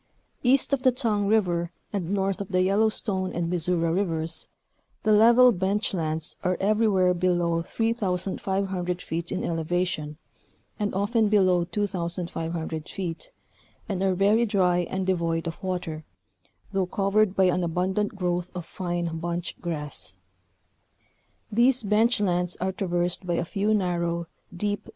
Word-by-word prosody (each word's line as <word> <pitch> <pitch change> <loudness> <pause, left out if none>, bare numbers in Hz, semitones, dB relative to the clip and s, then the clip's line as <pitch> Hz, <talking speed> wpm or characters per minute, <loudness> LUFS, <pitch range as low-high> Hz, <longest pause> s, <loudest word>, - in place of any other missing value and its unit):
Kast 265 +2 +4
of 275 - +2
the 260 -1 +5
Tongue 220 -5 0
River 175 -5 +1 0.2
and 185 -5 -2
north 195 0 0
of 200 - -4
the 185 -1 +2
Yellowstone 195 -1 +1
and 170 0 -2
Missouri 170 -1 +1
Rivers, 165 -4 -1 0.6
the 215 - +3
level 235 +4 +7
bench 200 +2 0
lands 160 -3 -1
are 180 -1 +1
everywhere 200 -3 +3
below 175 -2 +1
3,500 190 -3 -1
feet 170 0 -4
in - - -2
elevation, 165 -2 -2 0.6
and 205 -2 -1
often 210 +2 +2
below 185 -4 +4
2,500 170 -4 -3
feet, 175 -4 -5 0.6
and 195 -4 -2
are 190 -1 +2
very 205 +5 +3
dry 180 -4 +2
and 190 0 -2
devoid 170 -3 0
of 165 +2 -5
water, 175 -5 -3 0.7
though 195 -2 0
covered 200 +1 +1
by 190 - +4
an 180 -1 +2
abundant 185 +5 -1
growth 180 -2 -1
of 175 -2 -5
fine 175 -3 -3
bunch 170 +1 -3
grass. 150 - -4 1.3
'These 240 +3 +3
bench 220 +4 +3
lands 180 -3 +1
are 185 +1 0
traversed 180 -1 -1
by 175 - +1
a 170 - -1
few 200 +5 -1
nar 180 -5 +1
row, 170 0 -1 0.3
deep. 205 +3 -3
185 Hz, 140 wpm, -26 LUFS, 170-205 Hz, 1.3 s, level